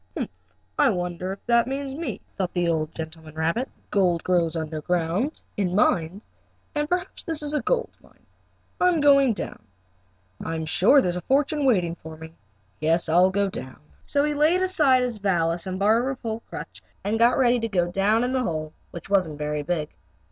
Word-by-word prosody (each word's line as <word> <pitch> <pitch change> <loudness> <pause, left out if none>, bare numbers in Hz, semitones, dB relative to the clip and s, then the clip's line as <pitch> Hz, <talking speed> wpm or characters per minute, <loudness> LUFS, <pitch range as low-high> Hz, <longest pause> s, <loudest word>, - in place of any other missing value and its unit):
"Humph! - - -3 0.5
I 285 - +5
wonder 180 -2 -3
if 195 - -9
that 235 0 +3
means 270 0 -3
me?" 320 +4 -5
thought 185 -3 -2
the 175 -1 0
old 160 -1 -1
gentleman 160 -1 -8
rabbit. 165 +11 0
"Let's - - -32
see, - - -34
gold 180 -4 +2
grows 170 -3 +1
under 160 -1 -4
ground, 180 - -1
in 185 -3 0
mines, 185 0 +1 0.5
and 295 0 -1
perhaps 360 +1 -2
this 320 -3 -2
is 295 0 -3
a 300 - +1
gold 475 - 0
mine. - - -24 0.5
I'm 360 -2 +3
going 275 -4 +5
down. 205 - -6 0.8
I'm 160 -1 -3
sure 210 - +5
there 180 - 0
is 175 - -2
a - - -4
fortune 285 - +1
waiting 180 -9 +2
for 160 -1 -10
me. 160 0 -11 0.5
Yes, 165 +3 +2
I'll 180 +3 +5
go 200 +1 +1
down." 130 -8 -7 0.3
So 285 -1 +1
he 300 0 +1
laid 315 +5 +3
aside 290 -9 +3
his 240 -4 -2
valise 175 -3 0
and 185 0 -3
barber 230 +7 +2
pole 230 -3 -5
crutch - - -8 0.2
and 215 +2 -1
got 235 +2 +5
ready 245 -2 +3
to 230 - -1
go 175 -5 0
down 205 +5 +2
in 250 +1 -1
the 260 - +1
hole, 155 -7 -3 0.2
which 170 - -9
wasn't 185 -7 +1
very 150 0 -2
big. 155 -1 -2
195 Hz, 195 wpm, -24 LUFS, 165-265 Hz, 0.8 s, I